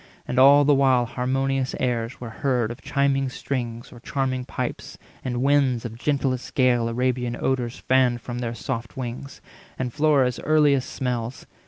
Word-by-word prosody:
And 125 - 0
all 140 +2 +7
the 145 - +5
while 130 -3 +4
harmonious 130 +2 -1
airs 120 -1 -2
were 120 -2 -7
heard 125 -2 0
Of 120 - -9
chiming 140 -1 +1
strings 120 -3 -4
or 120 - -12
charming 130 0 -2
pipes; - - -5 0.3
and 125 -1 -2
winds 135 -4 +2
Of 115 -1 -5
gentlest 135 -3 -1
gale 125 -4 +3
Arabian 125 0 -1
odours 125 -2 -1
fanned 130 -2 +2
From 120 +1 -6
their 120 -1 -3
soft 115 +3 -5
wings, 130 +2 -6 0.4
and 125 -2 -3
Flora's 145 -5 +2
earliest 145 -3 +3
smells. 125 -2 -3
130 Hz, 155 wpm, -24 LUFS, 120-135 Hz, 0.4 s, all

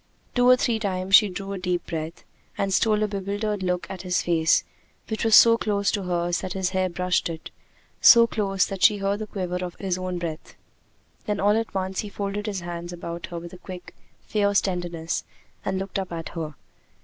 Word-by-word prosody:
Two 245 0 +4
or 255 - +9
three 235 -3 0
times 190 -2 -3
she 210 0 +8
drew 195 +2 -5
a 195 - -4
deep 180 -1 -1
breath, 160 0 -5 0.3
and 195 -1 0
stole 215 +1 +3
a - - +1
bewildered 205 +1 -3
look 180 -1 -1
at 190 - -7
his 180 -1 0
face, 165 -2 +3 0.5
which 220 - -2
was 225 -1 +5
so 230 0 +8
close 200 -2 +1
to 205 - -1
hers 175 -1 -1
that 185 - -4
his 190 -1 -1
hair 185 -1 +1
brushed 180 0 0
it 160 -1 -7 0.5
so 235 -1 +9
close 195 -4 0
that 195 -2 -6
she 205 +4 +6
heard 200 +1 -1
the 215 - -5
quiver 180 -3 -3
of 175 -1 -5
his 185 -2 -2
own 185 -1 -3
breath. 165 -2 -6 0.7
Then 210 -1 -1
all 205 +1 +3
at 225 -2 -2
once 190 0 -2
he 210 - -3
folded 200 +1 -4
his 200 -3 -3
hands 175 0 -6
about 170 -1 -6
hers 170 -1 -6
with 170 - -9
a 180 - -11
quick, 180 -1 -9 0.3
fierce 200 -1 +2
tenderness, 175 -3 -3 0.4
and 190 -1 -1
looked 195 +1 -3
up 190 -2 -5
at 165 -1 -5
her. 155 -3 -5
190 Hz, 210 wpm, -25 LUFS, 175-205 Hz, 0.7 s, or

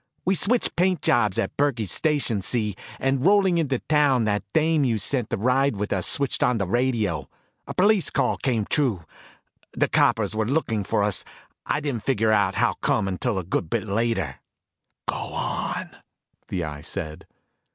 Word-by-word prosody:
We 190 - +3
switched 230 +6 +1
paint 180 0 +1
jobs 105 -5 +2
at 95 - -2
Burkey's 120 - 0
station, 145 -9 +1
see, 105 0 0 0.2
and 135 -1 0
rolling 190 -2 +4
into 140 -5 0
town 145 -4 +2
that 105 -1 0
dame 160 -1 +2
you 120 -4 +1
sent 120 +2 0
to - - -1
ride 130 +4 +2
with 105 +1 -2
us 95 -2 +1
switched 140 -2 +1
on 125 -1 +3
the 100 - -1
radio. 110 - 0 0.4
A - - -6
police 200 0 +3
call - - 0
came 115 -6 0
through. 120 - 0 0.7
The - - +1
coppers - - +2
were 110 0 0
looking 115 -7 0
for 100 - 0
us. 105 -1 0 0.4
I 150 - 0
didn't 135 -7 -3
figure 110 -4 +1
how 105 -2 +2
come 100 - +1
until 95 +4 -1
a 95 - -2
good 85 -1 -2
bit - - -1
later." 100 - -1 0.7
"Go - - 0 0.2
on," - - -3 0.6
the 90 - -3
Eye 75 -2 -6
said. 80 -1 -6
115 Hz, 170 wpm, -24 LUFS, 100-145 Hz, 0.7 s, rolling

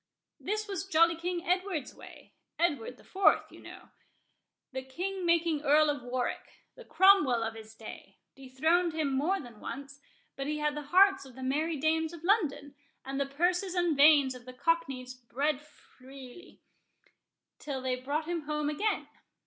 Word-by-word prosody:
This 425 +1 -3
was 385 -2 -4
jolly 335 -1 +4
King 345 +1 -4
Edward's 360 -6 -1
way—Edward 285 -8 -5
the - - -19
Fourth, 390 0 +2
you - - -14
know. - - -12 0.8
The 260 0 -4
king 360 +8 -4
making 335 -3 +2
Earl 300 +1 +4
of 290 - -5
Warwick—the 250 - -5
Cromwell 355 -12 +5
of 225 0 -3
his 220 0 -12
day—dethroned 270 +9 -2
him 305 -4 -1
more 325 +9 +1
than 240 -5 -11
once; 275 0 -8 0.3
but 275 0 -4
he 300 0 -1
had 300 0 0
the 295 - -4
hearts 385 +3 +5
of 265 -3 -14
the 260 - -8
merry 305 +5 0
dames 320 +2 0
of 335 -1 -11
London, 315 -8 +1 0.3
and 270 +1 -4
the 280 - 0
purses 355 +6 0
and 350 -3 +2
veins 285 -2 +6
of 250 -1 -12
the 255 - -9
cockneys 270 -3 -1
bled 265 +4 -2
freely, 270 +1 -15 1.0
till 280 -3 -4
they 255 -1 -1
brought 285 +5 -3
him 335 -3 -4
home 300 -1 -1
again. 420 +8 -1
300 Hz, 155 wpm, -30 LUFS, 265-345 Hz, 1.0 s, veins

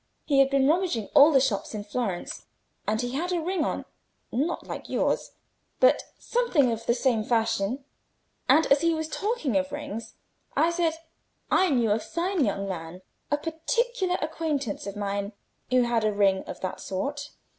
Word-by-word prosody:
He 280 -3 +3
had 270 0 +6
been 275 -1 +3
rummaging 320 - +1
all 290 +3 +8
the 275 - +6
shops 230 -5 -1
in 210 - -4
Florence. 205 -4 -4 0.4
And 215 +1 +1
he 245 0 -2
had 335 +7 -2
a 355 - +1
ring 345 0 -1
on—not 295 +9 -4
like - - -7
yours, - - 0 0.5
but - - +5 0.2
something 365 - +2
of 230 0 -4
the 235 - +3
same 240 -3 +1
fashion; 225 +2 0 0.6
and 320 - +6
as 275 +1 +6
he 335 -1 +3
was 315 0 -2
talking 400 - -1
of 280 0 -1
rings, 285 -6 -6 0.4
I 335 - +4
said 340 -2 +1 0.6
I 375 - +4
knew 240 -7 +2
a 210 - +3
fine 340 - -1
young 200 -3 -1
man, 175 0 -6 0.3
a 290 - +2
particular 365 +6 -1
acquaintance 305 -9 -2
of 200 - -5
mine, 200 0 -3 0.4
who 255 0 +4
had 235 -2 +1
a 215 - +2
ring 195 -2 +2
of - - -8
that 185 - -4
sort. 285 +10 -3
270 Hz, 170 wpm, -27 LUFS, 215-320 Hz, 0.6 s, all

